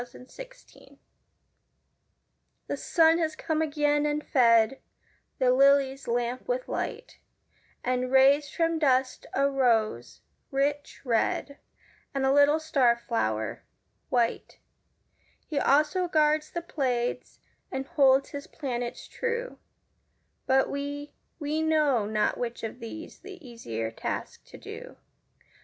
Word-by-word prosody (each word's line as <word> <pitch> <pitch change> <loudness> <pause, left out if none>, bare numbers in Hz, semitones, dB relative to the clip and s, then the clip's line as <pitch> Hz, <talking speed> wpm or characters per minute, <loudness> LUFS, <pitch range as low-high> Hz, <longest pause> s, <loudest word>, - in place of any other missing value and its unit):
An - - -11
Easter - - -10 0.3
Hymn - - -20 1.7
The - - -3
Sun 325 -1 +3
has 315 -2 -1
come 315 0 -2
again 295 -1 +1
and 300 0 -2
fed 230 -1 +3 0.6
The 255 -1 +3
lily's 275 0 +3
lamp 240 +1 -2
with - - -2
light, 485 +1 -5 0.6
And 250 0 -1
raised 275 +2 +4
from 330 -1 +1
dust 260 -3 +1
a 275 +1 +3
rose, 230 - 0 0.3
rich 285 +1 -2
red, 250 +4 0 0.6
And 270 -1 0
a 265 - +3
little 285 +2 +5
star 265 -7 +2
flower, 110 - -2 0.5
white; 240 -2 -1 0.9
He 300 -3 -2
also 300 +7 +2
guards 305 -1 +2
the 345 - -5
Pleiades 250 -8 -2 0.3
And 265 0 -3
holds 270 -1 +3
his 285 0 -7
planets 245 -5 -5
true: 480 +1 -4 0.9
But 265 0 +3
we 285 +1 -5 0.2
we 305 0 -2
know 300 -9 +2
not 215 0 0
which 240 -1 -4
of 225 +2 -5
these 255 +8 -9
The 390 -2 -11
easier 115 - -5
task - - -5
to - - -13
do. - - -10
275 Hz, 120 wpm, -27 LUFS, 245-305 Hz, 1.7 s, little